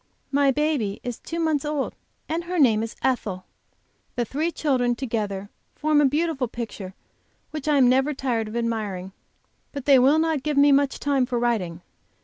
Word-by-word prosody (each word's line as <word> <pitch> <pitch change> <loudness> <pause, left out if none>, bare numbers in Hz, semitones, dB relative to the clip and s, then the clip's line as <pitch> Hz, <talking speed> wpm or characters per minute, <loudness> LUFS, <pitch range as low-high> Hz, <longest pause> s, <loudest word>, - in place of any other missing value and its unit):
My 280 0 +3
baby 270 -8 0
is 245 -2 -5
two 335 - -5
months 315 -4 +1
old, 295 -2 -2 0.3
and 335 +2 -2
her 360 +1 -3
name 230 -8 +4
is 225 0 -5
Ethel. 205 -8 -1 0.7
The 240 - 0
three 310 +8 -1
children 255 -7 +1
together 210 -6 -3 0.2
form 300 -1 +2
a - - +4
beautiful 295 -1 0
picture 220 -5 -7 0.6
which 305 -1 -6
I 300 -1 +3
am 260 -2 +6
never 265 +4 +3
tired 240 -5 -1
of 215 - -7
admiring. 215 -6 -2 0.6
But 280 -3 -6
they 275 -2 +7
will 275 +5 +5
not 320 -3 +1
give 300 0 -2
me 285 0 +6
much 280 0 +2
time 275 -3 +1
for 245 -1 -1
writing. 195 -8 -1
265 Hz, 175 wpm, -24 LUFS, 230-295 Hz, 0.7 s, they